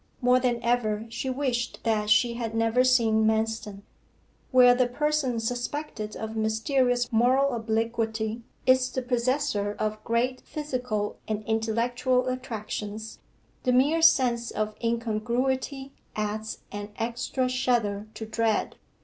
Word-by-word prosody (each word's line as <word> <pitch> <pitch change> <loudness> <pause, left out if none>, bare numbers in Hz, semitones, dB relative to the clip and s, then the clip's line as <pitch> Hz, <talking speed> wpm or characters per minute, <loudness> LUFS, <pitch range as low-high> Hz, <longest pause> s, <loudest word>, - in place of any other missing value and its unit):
More 250 0 +4
than 245 -2 0
ever 225 -3 +1
she 230 +3 -4
wished 255 -3 -2
that 215 -2 0
she 235 +2 +4
had 230 -1 -4
never 225 +2 +3
seen 230 -4 +3
Manston. 220 -2 -1 0.7
Where 250 -1 +7
the 250 0 +2
person 275 -2 0
suspected 245 -1 -4
of 220 0 -5
mysterious 245 +3 +1
moral 260 +4 +3
obliquity 225 0 -1 0.2
is 255 0 +4
the 260 - -3
possessor 245 -4 0
of 215 0 -2
great 245 +2 0
physical 250 -8 -3
and 215 0 -2
intellectual 240 +3 0
attractions, 220 -3 -5 0.4
the 250 - +1
mere 285 +6 +3
sense 250 -7 +4
of 215 0 -2
incongruity 240 +4 -1 0.2
adds 215 +1 -3
an 205 0 -6
extra 240 +3 -1
shudder 235 -5 0
to 220 - -5
dread. 220 -1 0
235 Hz, 125 wpm, -27 LUFS, 220-255 Hz, 0.7 s, Where